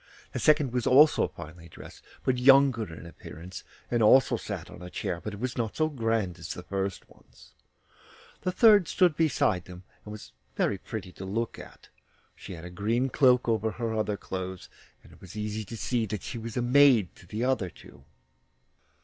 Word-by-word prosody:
The - - -4
second 150 -5 +3
was 125 -2 -1
also 150 +4 +6
finely 85 +1 -12
dressed, - - -13 0.2
but 125 -1 0
younger 130 -6 +5
in 80 - -10
appearance, 85 +1 -10 0.3
and 120 -1 +1
also 130 +5 +5
sat - - -6
on - - -12
a 90 - -8
chair, 85 -1 -4
but 105 - -4
it - - -11
was 125 +1 -3
not 110 -2 -2
so 155 0 +2
grand 115 - -1
as - - -6
the - - -8
first 95 -1 -4
one's. - - -21 0.9
The 185 - -1
third 205 -1 +5
stood 180 -5 +2
beside 125 - +1
them, 90 0 -11 0.2
and 105 - -10
was 105 -1 -10 0.2
very 100 - 0
pretty 95 -2 -7
to 95 - -10
look 115 +4 -3
at; - - -14 0.5
she - - -10
had 85 -1 -9
a 90 - -8
green 115 +8 0
cloak 125 -2 +3
over 110 -1 +1
her 115 -2 -3
other 105 -2 -1
clothes, 95 -1 -6 0.3
and - - -17
it - - -20
was 95 +2 -11
easy 105 0 -3
to 115 +3 -8
see 115 0 -1
that 105 -2 -5
she 120 -1 -6
was 115 0 -7
maid 125 -5 +4
to 90 - -17
the 110 +6 -4
other 125 -8 0
two. - - -17
110 Hz, 190 wpm, -28 LUFS, 95-130 Hz, 0.9 s, also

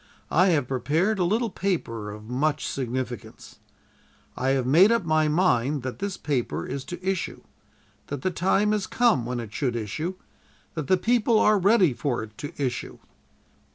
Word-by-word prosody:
I 180 +4 +4
have 150 -8 +2
prepared 160 - 0
a - - +3
little 220 +5 +1
paper 115 - -2
of 105 +1 -8
much 135 +7 -1
significance. 125 -2 -5 0.8
I 130 - -1
have 130 - -1
made 170 - +6
up 230 -6 +1
my 155 -1 +2
mind 150 -5 +2
that 130 -1 -5
this 200 -1 -3
paper 135 -5 -2
is 135 0 -4
to 180 +1 -7
issue; 190 -2 -2 0.7
that 140 -2 -5
the 185 - +1
time 195 +4 +2
is 210 -2 -1
come 225 - +2
when 125 -1 -2
it 110 -3 -7
should 125 -5 -1
issue; 135 - -3 0.6
that 155 -4 -4
the 185 - +4
people 230 +3 +2
are 210 -1 +4
ready 190 - +4
for 120 -2 -2
it 110 0 -11
to 145 - -5
issue. 130 -3 -3
155 Hz, 170 wpm, -25 LUFS, 125-190 Hz, 0.8 s, made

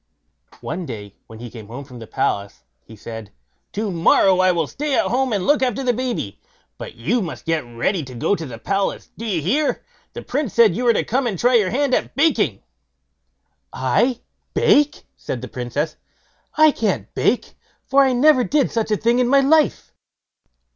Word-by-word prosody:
One 170 +1 -5
day, 105 -4 -8
when 110 - -12
he 120 0 -9
came 110 -4 -10
home 125 +6 -8
from 125 -3 -12
the 115 - -10
palace, 100 0 -2 0.2
he 110 - -14
said: 110 -1 -9 0.4
"To 210 0 -2
morrow 180 +2 +4
I 185 0 +4
will 170 -3 0
stay 290 - -2
at - - +2
home 260 +1 0
and 200 -4 -1
look 290 -1 +3
after 260 0 0
the 245 -1 +2
baby, 240 - -4 0.4
but - - -8
you 185 - 0
must 170 -5 -6
get 165 -2 0
ready 120 - -1
to 130 -1 -10
go 160 +12 +1
to 165 -5 -6
the 120 -3 -8
palace, 195 - -2
do 230 - -7
you 180 -9 -1
hear! 280 - +1
for - - -28 0.3
the - - -6
Prince 270 -4 -3
said 225 -7 +5
you 245 - -2
were 235 - +5
to - - 0
come 255 +2 0
and 205 -5 -2
try 245 +7 +2
your 215 -6 +4
hand 270 +4 0
at - - 0
baking." 240 - +1 1.1
"I 235 - +1 0.3
bake!" 290 0 +3
said 125 - -5
the - - -5
Princess; 135 +6 -3 0.6
"I 310 0 +7
can't 225 -6 -2
bake, - - 0 0.3
for 275 +1 +4
I 265 -1 +4
never 255 +1 +4
did 285 +1 +1
such 225 -2 -1
a 210 - +1
thing 235 +3 +2
in 250 - +2
my 275 +2 +5
life." 305 +3 +2
205 Hz, 195 wpm, -21 LUFS, -, 1.1 s, I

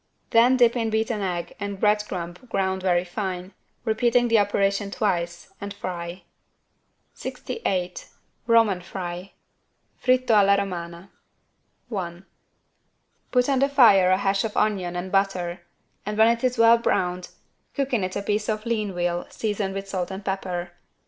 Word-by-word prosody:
Then 245 +3 +5
dip 240 -1 +4
in 230 -2 0
beaten 220 0 -1
egg 175 -3 -3
and 200 -1 -4
bread 210 0 +3
crumb 175 -2 -4 0.2
ground 190 -2 -1
very 180 -2 +2
fine, 185 0 -4 0.3
repeating 240 +2 +2
the 230 -1 +5
operation 200 0 +1
twice, 175 -4 -2
and 200 0 -5
fry. 175 -2 -6 0.9
68 180 - -4 0.4
ROMAN 225 -6 +4
FRY 180 +1 -6 0.7
(Fritto 255 -2 +3
alla 200 -1 +5
Romana) 175 -1 -5 0.8
I. 175 -1 -5 1.1
Put 250 -1 +2
on 275 -2 +2
the 275 +1 +3
fire 215 -10 +6
a 185 - +4
hash 195 0 +1
of 220 -2 -4
onion 190 -5 0
and 180 +1 -4
butter 185 -3 0 0.4
and 210 +1 -4
when 220 +1 +6
it 235 +1 0
is 250 -1 +1
well 230 0 +6
browned 180 -5 -1 0.5
cook 275 -2 -1
in 220 -6 +2
it 185 0 -3
a 200 - -2
piece 210 +1 -1
of 215 0 -2
lean 215 -5 -1
veal 175 0 -1
seasoned 205 -3 -2
with 195 0 -5
salt 185 -2 -3
and 195 +1 -7
pepper. 180 -2 -3
195 Hz, 150 wpm, -24 LUFS, 180-220 Hz, 1.1 s, fire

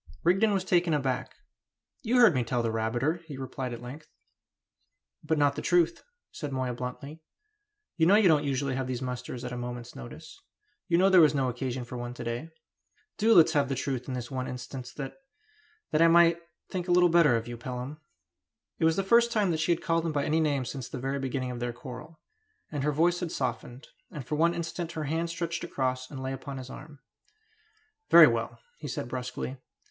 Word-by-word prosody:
Rigden 195 +5 +3
was 195 -2 0
taken 175 -3 +2
aback. 135 -3 -2 0.7
"You 245 0 +1
heard 240 -7 +7
me 130 -3 +1
tell 120 +1 -1
that 115 - 0
rabbiter," 120 +9 -1
he 145 -4 -7
replied 130 -1 -5
at 120 0 -7
length. 145 +5 -9 1.2
"But 155 +1 0
not 145 -1 +3
the - - -4
truth," 170 -1 +2 0.3
said 145 -2 -6
Moya 130 -2 -2
bluntly. 130 +6 -7 0.8
"You 160 -1 +4
know 195 - +6
you 210 -2 +5
don't 155 -3 +4
usually 140 -1 -1
have 130 0 -2
these 130 -1 -3
musters 125 0 -5
at 125 - -5
a 125 - -4
moment's 120 0 -6
notice; 60 -1 -11 0.5
you 170 - +3
know 185 +2 +5
there 185 -2 +8
was 155 -2 +5
no 135 -2 +1
occasion 125 0 -4
for 125 +1 -7
one 120 0 -6
to - - -7
day. 120 +7 -4 0.7
Do 225 +1 +4
let 165 - +9
us 165 - -3
have 145 -3 +2
the 135 - -1
truth 130 -1 -3
in 130 - -3
this 125 0 -6
one 130 -1 -3
instance 125 0 -7
that 135 -2 -7 0.7
that 155 - +2
I 165 - +7
may 170 0 +6 0.3
think 180 -1 -3
a - - 0
little 175 0 +6
better 165 -7 +5
of 115 0 -2
you, 120 - -5
Pelham!" 125 +4 -6 0.8
It - - +2
was 160 0 +4
the 195 - 0
first 235 +4 +4
time 210 -5 +2
that 160 - -1
she 155 +3 +1
had 170 - 0
called 165 0 +1
him 165 - -1
by 145 -2 -1
any 155 +2 +1
name 145 -4 +1
since 130 -1 -6
the 130 - -6
very 135 +2 -2
beginning 130 -1 -3
of 120 - -6
their 120 0 -3
quarrel. 125 +6 -10 0.5
And 145 -3 -3
her 150 - +2
voice 170 +4 +2
had 175 -3 -4
softened. 130 0 -4 0.2
And 150 -8 -8
for 150 - -5
one 165 +3 +2
instant 170 0 -4
her 155 - -3
hand 165 +3 -1
stretched 170 0 -3
across 130 -1 -2
and 135 -2 -7
lay 130 0 -3
upon 135 +1 -7
his 130 0 -8
arm. 145 0 -11 1.1
"Very - - +10
well!" - - -1 0.2
he - - -6
said - - -4
brusquely. 125 +1 -5
140 Hz, 215 wpm, -28 LUFS, 125-165 Hz, 1.2 s, Very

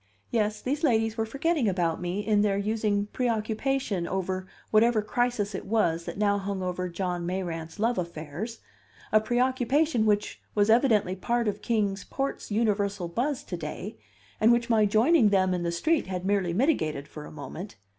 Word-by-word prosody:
Yes, 215 -2 0
these 285 +4 -2
ladies 225 -5 +2
were 225 -1 -1
forgetting 275 0 +1
about 175 -3 0
me 180 +4 -2
in 210 -1 +3
their 200 -1 +2
using 210 0 0
preoccupation 225 -3 -1
over 185 0 -2 0.2
whatever 220 0 +4
crisis 220 -2 0
it 190 - -5
was 170 -6 +1
that 170 - -6
now 205 -1 +2
hung 195 -1 -3
over 180 0 -2
John 175 0 -3
Mayrant's 170 -3 -4
love 230 +2 +1
affairs 170 +6 -5 0.5
a 215 - +5
preoccupation 250 +2 +1
which 210 0 0
was 205 +1 +4
evidently 220 -6 +3
part 235 +4 0
of 205 0 -2
Kings 210 -3 0
Port's 275 0 -4
universal 205 -4 0
buzz 250 - -1
to - - -5
day, - - -6 0.4
and 220 +2 +5
which 235 0 +2
my 215 -2 +4
joining 225 +4 +4
them 190 -2 +3
in 180 - -1
the 170 0 -1
street 310 - +1
had 185 -1 -4
merely 195 -3 +1
mitigated 170 - 0
for 150 -1 -9
a - - -10
moment. 165 +6 -8
210 Hz, 170 wpm, -27 LUFS, 185-235 Hz, 0.5 s, a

